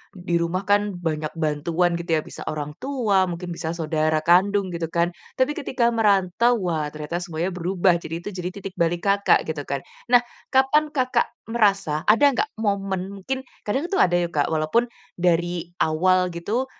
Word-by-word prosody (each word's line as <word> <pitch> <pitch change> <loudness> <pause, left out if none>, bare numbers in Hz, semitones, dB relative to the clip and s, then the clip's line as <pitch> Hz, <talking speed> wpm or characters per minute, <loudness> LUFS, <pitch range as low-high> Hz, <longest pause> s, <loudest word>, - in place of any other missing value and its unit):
di 175 -1 -2
rumah 170 +3 -1
kan 205 -1 +2
banyak 155 -3 -3
bantuan 165 +3 0
gitu 170 -1 -5
ya 155 - 0
bisa - - -9
orang 150 -1 -4
tua 225 -9 +1
mungkin 175 +1 -5
bisa 160 0 -3
saudara 155 -1 0
kandung 190 +3 +3
gitu 170 -1 -3
kan. 170 +1 0 0.3
Tapi 260 +3 +3
ketika 255 -6 +1
merantau 215 +1 +3
wah 160 -4 -1
ternyata 155 +3 -4
semuanya 170 +1 -3
berubah, 180 0 +2
jadi 165 +1 -6
itu - - -4
jadi 180 -1 -3
titik 195 -1 -7
balik 170 +1 +1
Kakak 200 0 +4
gitu 155 -2 -3
kan. 140 -1 -3 0.3
Nah 245 0 +7 0.3
kapan 285 +3 +3
Kakak 255 -3 +2 0.2
merasa 195 -9 +2
ada 220 +7 +5
nggak - - 0
momen 195 -2 -1
mungkin 265 +7 -3 0.2
kadang 270 +11 0
tuh 385 - +1
ada 175 -1 +2
ya, 175 - 0
Kak, 145 -2 +1
walaupun 160 +10 +1 0.3
dari 175 0 0
awal 180 +3 +2
gitu, 210 +10 -2
180 Hz, 170 wpm, -23 LUFS, 165-205 Hz, 0.3 s, Nah